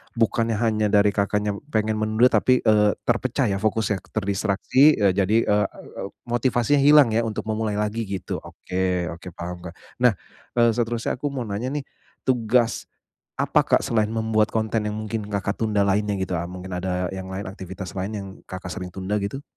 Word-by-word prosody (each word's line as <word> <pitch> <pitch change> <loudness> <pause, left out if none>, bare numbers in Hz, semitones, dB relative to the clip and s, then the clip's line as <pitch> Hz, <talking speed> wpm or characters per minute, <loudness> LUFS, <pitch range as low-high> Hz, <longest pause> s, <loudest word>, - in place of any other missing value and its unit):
bukannya 115 0 +1
hanya 110 -1 +1
dari 105 0 +5
Kakaknya 105 0 0 0.2
pengen 110 0 +1
menunda 110 +3 +4
tapi, 130 -1 +3
eee, 105 -1 +4
terpecah 120 0 +1
ya 95 - 0
fokusnya, 110 -1 0 0.2
terdistraksi, 105 +8 +3
eee, 100 -2 +3
jadi, 100 +3 +3
eee, 105 0 +3
e - - -17 0.2
e - - -3 0.3
motivasinya 120 +3 +2
hilang 145 -2 +7
ya 115 +1 +1
untuk 110 -1 -3
memulai 110 -1 -1
lagi 105 +2 -1
gitu. 95 -2 -4
Oke, 90 -1 -2
oke 85 +2 -9
paham 90 +1 -5
Kak, 85 - -9 0.3
nah, 125 -2 +5 0.4
eee, 120 -1 +5
seterusnya 120 +1 -1
aku 145 - -2
mau 130 - -3
nanya 115 +5 -3
nih. 145 -2 -2 0.4
Tugas 120 -2 +1 0.5
apa - - +2
Kak - - +3
selain 110 -2 +1
membuat 110 -1 +2
konten 110 -1 0
yang 105 - -2
mungkin 110 0 -4
Kakak 100 -1 -2
tunda 105 -2 +1
lainnya 100 +1 +1
gitu 95 -2 -2
a 85 - -3
mungkin 90 +1 -8
ada 90 0 -2
yang 95 0 -6
lain, 95 +1 -5
aktivitas 95 -1 -7
lain 95 +4 -3
yang 100 -2 -5 0.2
Kakak 95 -1 -7
sering 90 +1 -6
tunda 95 +2 -1
gitu? 100 +8 -4
105 Hz, 180 wpm, -24 LUFS, 95-115 Hz, 0.5 s, hilang